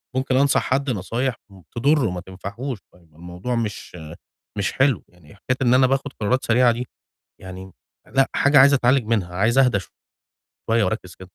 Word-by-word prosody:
ممكن 130 0 0
أنصح 140 0 +3
حد 135 +1 -1
نصايح 115 +4 -2
م 95 -1 -16
تضُره 135 0 +2
ما 90 -1 -5
تنفعهوش، 100 +6 -7
فالموضوع 90 +6 -7
مش 110 -5 -4 0.6
مش 100 - -1
حلو، 135 -5 +2
يعني 90 0 -19
حكاية 130 +6 -3
إن 125 -1 +3
أنا 130 0 +5
باخُد 135 +1 -2
قرارات 125 +5 0
سريعة 120 +1 +4
دي، 120 +2 -4 0.5
يعني 95 0 -10 0.4
لأ، 135 0 +4
حاجة 140 0 +4
عايزة 140 +1 +7
أتعالِج 125 -1 +2
منها، 100 -6 -1
عايز 110 +7 +1
أهدى 125 -7 +4 0.9
شوية 115 0 +3
وأركِز 90 -2 -3
كده. 95 - -13
115 Hz, 165 wpm, -22 LUFS, 95-130 Hz, 0.9 s, عايزة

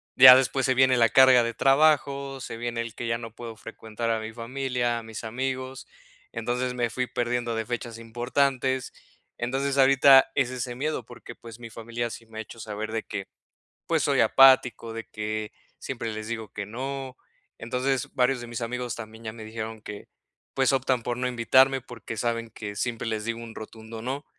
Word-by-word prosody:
ya 130 -1 +11
después 135 0 +2
se 130 - +3
viene 130 0 +4
la 115 -1 +5
carga 130 0 +6
de 115 0 -2
trabajo, 140 0 +2
se 115 - -6
viene 120 0 -3
el 115 -2 -6
que 120 - -5
ya 115 0 0
no 115 -2 -9
puedo 115 -1 -8
frecuentar 115 +1 -6
a 115 - 0
mi 110 +1 -7
familia, 120 0 -2
a - - -10
mis 110 0 -8
amigos, 130 +3 -4 0.5
entonces 125 +1 -2
me 120 -1 -1
fui 125 +2 -2
perdiendo 120 -1 -1
de 110 0 -2
fechas 120 -1 -5
importantes, 130 +3 0 0.5
entonces 135 +3 -1
ahorita 135 0 +7
es 130 -3 +2
ese 125 -1 -4
miedo 140 -2 -2
porque 120 0 -11
pues 115 -1 -12
mi 115 - -8
familia 115 +1 -4
sí 115 - -9
me 110 -1 -10
ha - - -1
hecho 115 +1 -12
saber 110 0 -5
de 110 -1 -2
que, 100 -2 -6 0.6
pues - - +2
soy - - +2
apático, 125 -4 +5
de 115 0 -6
que 110 0 -4 0.3
siempre 115 -4 -4
les 110 0 -6
digo 110 -2 -5
que 100 -1 -5
no, 130 +3 -5 0.4
entonces, 125 +3 -2
varios 125 0 +2
de 120 - -7
mis 120 +1 -6
amigos 125 0 -3
también 110 0 -10
ya 110 - -4
me 110 0 -10
dijeron 110 0 -6
que 105 -1 -8 0.5
pues 135 0 +2
optan 130 -2 +1
por 120 +1 -2
no 125 +1 -2
invitarme 130 +2 +4
porque 115 -2 -8
saben 115 0 -2
que 105 -2 -7
siempre 120 0 -2
les 110 -1 -2
digo 115 +1 -3
un 115 -1 -10
rotundo, 110 +1 -9
no, 135 +4 -4
120 Hz, 195 wpm, -26 LUFS, 115-130 Hz, 0.6 s, ya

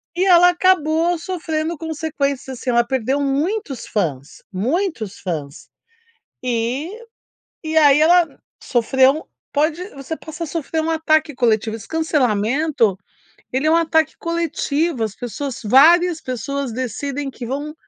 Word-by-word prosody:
e 370 - +1
ela 355 -1 +7
acabou 345 -1 +2
sofrendo 325 -2 -3
consequências, 280 -4 -3
assim, 260 - -4
ela 240 -1 +4
perdeu 265 +2 -1
muitos 285 - -2
fãs, 145 -9 -3
muitos 245 - -2
fãs, 150 -6 -5 0.8
e 250 +6 -1 0.7
e 315 0 -3
aí 290 -1 +6
ela 345 +2 +6 0.4
sofreu 265 +5 +2 0.3
pode 310 +4 +1
você 275 +4 -5
possa 315 +1 -7
sofrer 320 0 -3
um 320 - -2
ataque 315 -2 +1
coletivo, 220 -3 +1
esse 215 -3 -10
cancelamento 260 - +1 0.6
ele 265 +4 0
é - - +4
um - - +5
ataque 320 -2 +1
coletivo, 335 -4 -1
as 215 -2 -3
pessoas 250 +2 -5
várias 325 - +5
pessoas 255 +1 -4
decidem 270 +3 -4
que 245 - -8
vão 285 +5 -4
285 Hz, 130 wpm, -20 LUFS, 245-320 Hz, 0.8 s, ela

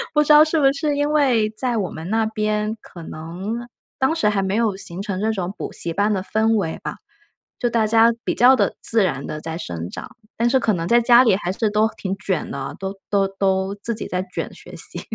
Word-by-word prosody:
不 300 - +5
知 300 - -8
道 300 +1 +9
是 315 0 0
不 275 -1 +4
是 290 +1 -1
因 290 +1 0
为 255 -8 +3
在 240 +2 -1
我 195 -4 -2
们 160 +3 -7
那 220 +1 +1
边， 215 0 -1
可 170 - -12
能 185 +10 -6 0.3
当 265 +5 +2
时 220 - +1
还 200 -2 0
没 190 +1 -1
有 220 -4 +1
形 185 -2 -6
成 195 -2 -3
这 220 +1 +1
种 190 -3 -3
补 - - -6
习 165 - -2
班 205 +3 +1
的 190 -2 -1
氛 220 +2 +1
围 170 -6 -2
吧， - - -4 0.6
就 240 - +1
大 230 -2 +1
家 225 +1 +5
比 - - -1
较 255 +2 +6
地 - - +1
自 225 -2 +5
然 140 -7 -2
地 155 - -5
在 160 +1 -5
生 85 - -5
长， - - -9 0.2
但 235 +1 +2
是 265 - +3
可 220 -4 +1
能 165 -1 -2
在 240 0 +5
家 240 +1 +6
里 215 -6 +4
还 180 -2 -3
是 215 +3 0
都 215 +1 +2
挺 195 0 -4
卷 190 -5 -2
的， 140 0 -5
都 195 0 -4 0.2
都 195 -1 +2
都 195 0 -1
自 230 +3 -3
己 220 - -5
在 180 0 -2
卷 - - -4
学 - - -12
习。 - - -5
210 Hz, 255 characters per minute, -21 LUFS, 190-235 Hz, 0.6 s, 道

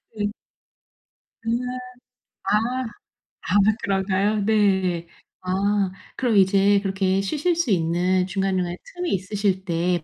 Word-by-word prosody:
네. 205 -1 -1 1.2
으아. 225 - +1 1.1
아. 250 +4 -1 0.7
아 185 - +1 0.3
그런가요? 195 +2 +1
네. 190 -5 +2 0.3
아 195 +1 0 0.3
그럼 240 -4 +1
이제 195 +1 +4
그렇게 190 -1 0
쉬실 305 - 0
수 325 -8 0
있는 180 +1 +1
중간중간에 185 -2 -1 0.2
틈이 355 -1 -2
있으실 195 0 -1
때 175 -1 0
195 Hz, 205 characters per minute, -23 LUFS, 185-210 Hz, 1.2 s, 이제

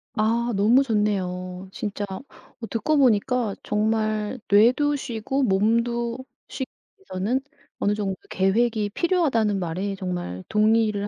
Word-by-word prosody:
아. 230 +2 +1
너무 230 +7 +5
좋네요. 185 -5 -2
진짜 205 0 -4
어 190 +5 -6 0.5
듣고 300 +7 +1
보니까 245 -3 +2
정말 215 +2 0
뇌도 250 +8 +4
쉬고 265 +1 -2
몸도 235 +3 +1 0.3
쉬 265 - -4 0.3
위해서는 245 - -2 0.4
어느 205 - +1
정도 200 -2 -2 0.2
계획이 210 +2 +1
필요하다는 235 - +1
말에 185 +4 -3
정말 175 - -4
동의를 215 -1 +2
215 Hz, 250 characters per minute, -24 LUFS, 200-240 Hz, 0.5 s, 너무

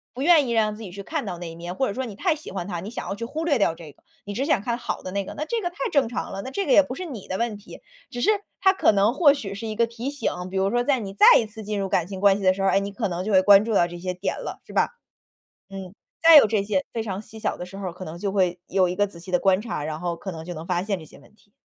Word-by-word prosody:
不 265 - -3
愿 310 -5 +5
意 - - -2
让 215 -2 +1
自 225 - -12
己 190 -5 -8
去 200 +1 -8
看 315 +2 -3
到 180 -4 -5
那 175 -1 -7
一 - - -10
面， 175 +2 -7
或 265 - +1
者 200 - -3
说 260 - -3
你 215 -5 -7
太 335 - +1
喜 310 - -10
欢 190 -1 -4
他， 175 -3 -4
你 195 +5 -7
想 245 - -6
要 - - -2
去 230 - -7
忽 315 +6 -4
略 285 -8 +2
掉 165 -4 +2
这 160 -3 -11
个， - - -29 0.2
你 205 - -5
只 260 - -1
想 280 -7 +2
看 235 0 -1
好 - - -5
的 185 - -6
那 200 0 -1
个， - - -9
那 305 - -3
这 460 +5 -2
个 350 - -1
太 350 - -22 0.2
正 275 -6 +2
常 245 - -4
了， 195 - -4
那 260 - -6
这 395 +7 -2
个 - - -1
也 - - +8
不 270 -2 -6
是 370 - -6
你 245 - -8
的 190 - -3
问 230 -2 -1
题。 205 - -13 0.3
只 245 -3 -6
是 415 - +3 0.3
它 380 0 +5
可 385 - +4
能 205 +3 +3
或 285 -1 +5
许 200 -8 -6
是 220 +3 -6
一 215 - -4
个 235 - +3
提 235 +3 -5
醒， 285 -1 -2 0.2
比 190 - -4
如 195 +2 +1
说 240 0 +1
在 265 -1 +2
你 195 -3 -6
再 - - +5
一 225 - -1
次 215 0 -10
进 205 0 -3
入 195 - -1
感 175 -2 0
情 190 -1 -7
关 200 0 +5
系 200 - -6
的 185 0 +4
时 195 - -4
候， - - +3
哎， 195 - +3
你 200 0 -4
可 210 0 -2
能 180 0 -3
就 215 - -3
会 190 -1 +6
关 205 0 +7
注 225 -1 -2
到 175 - +5
这 175 0 -9
些 180 0 -3
点 190 +2 -2
了， - - -7
是 - - -12
吧。 - - +2 0.8
嗯， 190 -2 -8 0.3
再 325 -1 +9
有 280 - +9
这 210 -2 0
些 200 -2 -1
非 225 - -2
常 200 -2 -4
细 220 +1 -12
小 215 - -1
的 180 - -7
时 195 +2 -11
候 195 -1 -5
儿， - - -7
可 185 +1 -9
能 160 +2 -7
就 200 +1 -2
会 180 -3 +1
有 185 -1 +2
一 180 - -2
个 205 +2 +2
仔 170 - -14
细 180 +2 -10
的 180 - +3
观 190 0 +3
察， 215 -10 -4
然 155 +1 -4
后 175 -1 -2
可 190 - -6
能 160 -2 -8
就 175 0 -6
能 160 +1 -7
发 175 0 -1
现 200 -3 -1
这 - - -11
些 - - -16
问 175 +9 -21
题。 205 -1 -29
200 Hz, 375 characters per minute, -24 LUFS, 185-240 Hz, 0.8 s, 再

